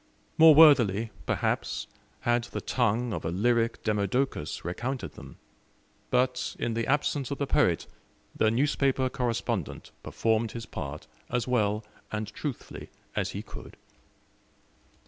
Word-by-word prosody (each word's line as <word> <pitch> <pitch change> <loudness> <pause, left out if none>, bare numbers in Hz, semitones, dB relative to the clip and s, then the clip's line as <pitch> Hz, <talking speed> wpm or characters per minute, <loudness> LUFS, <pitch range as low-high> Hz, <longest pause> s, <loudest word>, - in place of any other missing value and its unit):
More 160 -1 +8
worthily, 115 -9 +6 0.2
perhaps, - - -1 0.4
had 120 0 +1
the - - -5
tongue 120 -1 0
of - - -4
a 80 - -1
lyric 115 +6 +1
Demodocus 105 - -1
recounted 120 +9 -3
them; - - -12 0.7
but, 125 0 +1
in 115 - -1
the 115 0 -1
absence 145 -1 0
of 140 - -3
the 140 - -1
poet, - - +2 0.5
the 110 - +3
newspaper 130 +1 +1
correspondent 125 -4 -2
performed 110 0 0
his 115 -1 -6
part 70 -5 -6 0.2
as 120 -1 -1
well 105 -3 +1 0.3
and 110 0 -2
truthfully 140 +2 -6 0.3
as - - -1
he - - -5
could. - - -11
120 Hz, 125 wpm, -28 LUFS, 110-130 Hz, 0.7 s, More